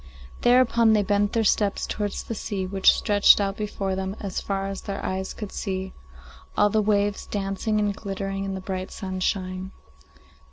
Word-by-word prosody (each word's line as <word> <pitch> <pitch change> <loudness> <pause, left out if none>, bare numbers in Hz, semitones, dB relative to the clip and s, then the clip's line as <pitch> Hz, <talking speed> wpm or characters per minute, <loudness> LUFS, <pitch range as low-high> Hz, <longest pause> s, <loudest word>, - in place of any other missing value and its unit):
Thereupon 240 -2 +5
they 210 -1 +3
bent 205 +1 +1
their 230 -1 +2
steps 205 -1 +1
towards 205 -1 -3
the - - -5
sea, 205 -3 -3
which 190 0 +5
stretched 205 -1 +5
out 195 -1 0
before 200 -2 -3
them, 190 +1 -3
as 195 -2 -3
far 195 -1 -2
as 195 -1 -4
their 200 -1 -5
eyes 190 0 -2
could 210 -3 -7
see, 190 -2 -4 0.6
all 205 0 +4
the 215 - +3
waves 205 0 +1
dancing 200 +2 -1
and 205 -1 0
glittering 195 -1 -4
in 195 -1 -3
the 190 - -5
bright 185 0 -4
sunshine. 185 -1 -3
200 Hz, 170 wpm, -25 LUFS, 190-210 Hz, 0.6 s, Thereupon